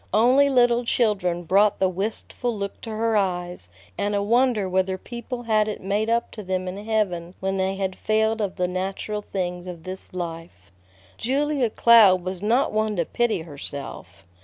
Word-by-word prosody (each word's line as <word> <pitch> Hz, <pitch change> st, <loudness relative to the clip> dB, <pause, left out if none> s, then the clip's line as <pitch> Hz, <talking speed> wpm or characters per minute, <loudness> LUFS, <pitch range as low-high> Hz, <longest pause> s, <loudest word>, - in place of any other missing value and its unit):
Only 255 Hz, +6 st, +5 dB
little 245 Hz, -2 st, +3 dB
children 195 Hz, -8 st, +1 dB
brought 200 Hz, +4 st, +3 dB
the 190 Hz, -, +2 dB
wistful 215 Hz, +4 st, -3 dB
look 200 Hz, 0 st, -5 dB
to 230 Hz, -, -7 dB
her 220 Hz, +1 st, 0 dB
eyes, 180 Hz, -, -1 dB, 0.3 s
and 205 Hz, 0 st, 0 dB
a 200 Hz, -, +1 dB
wonder 235 Hz, -2 st, +2 dB
whether 190 Hz, 0 st, 0 dB
people 240 Hz, +4 st, -7 dB
had 215 Hz, -2 st, +2 dB
it 210 Hz, -, -4 dB
made 205 Hz, +3 st, -1 dB
up 235 Hz, +1 st, 0 dB
to 215 Hz, -, -8 dB
them 185 Hz, -1 st, -2 dB
in 195 Hz, +3 st, -5 dB
heaven 190 Hz, -6 st, -1 dB
when 195 Hz, 0 st, -1 dB
they 190 Hz, 0 st, 0 dB
had 190 Hz, -1 st, -2 dB
failed 220 Hz, +1 st, +1 dB
of 200 Hz, -3 st, -2 dB
the 180 Hz, -1 st, 0 dB
natural 195 Hz, +3 st, -3 dB
things 180 Hz, -3 st, -4 dB
of 170 Hz, -3 st, -8 dB
this 185 Hz, 0 st, -5 dB
life. 165 Hz, -, -7 dB, 0.5 s
Julia 275 Hz, 0 st, 0 dB
Cloud 210 Hz, -6 st, +6 dB
was 185 Hz, 0 st, -5 dB
not 235 Hz, +6 st, +2 dB
one 215 Hz, 0 st, 0 dB
to 170 Hz, -3 st, 0 dB
pity 225 Hz, -4 st, 0 dB
herself. 140 Hz, -, -8 dB
200 Hz, 175 wpm, -24 LUFS, 185-225 Hz, 0.5 s, Cloud